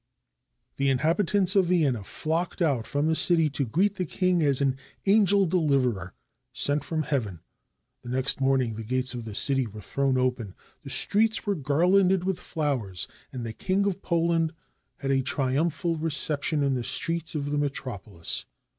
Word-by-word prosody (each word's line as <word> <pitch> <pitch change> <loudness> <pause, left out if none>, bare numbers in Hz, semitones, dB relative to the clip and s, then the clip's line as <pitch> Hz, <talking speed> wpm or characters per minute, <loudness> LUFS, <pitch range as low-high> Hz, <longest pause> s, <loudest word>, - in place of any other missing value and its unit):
" - - -51
The 140 0 +1
inhabitants 180 +8 +2
of 195 -2 +4
Vienna 145 - +1
flocked 165 - -3
out 140 -10 0
from 145 +1 -1
the 160 - +2
city 160 -2 +5
to 140 -2 -2
greet 195 - +1
the 185 - -1
king 180 +1 +1
as 140 -4 +2
an 135 -2 +1 0.3
angel 200 -1 +4
deliverer 140 - 0 0.4
sent 145 +3 +1
from 155 0 -2
heaven. 110 - -3 0.6
The 120 - -10
next 130 +2 +1
morning 135 -3 +1
the 110 +1 -6
gates 130 +2 -2
of 120 -2 -6
the 110 -2 -7
city 135 0 +1
were 105 0 -10
thrown 135 +4 -1
open, 125 -6 -1 0.3
the - - -10
streets 220 +2 +2
were 205 - +1
garlanded 180 +5 +2
with 190 -1 -1
flowers, 130 - -2 0.2
and 125 -3 -6
the 110 - -5
King 195 - 0
of 195 -1 -2
Poland 165 -1 0 0.4
had 135 -1 -2
a 135 -1 +2
triumphal 150 +5 -1
reception 150 -1 0
in 140 -1 +1
the 125 -2 -2
streets 165 +4 -2
of 145 -1 -3
the 145 - 0
metropolis. 110 - -2
145 Hz, 170 wpm, -26 LUFS, 130-170 Hz, 0.6 s, city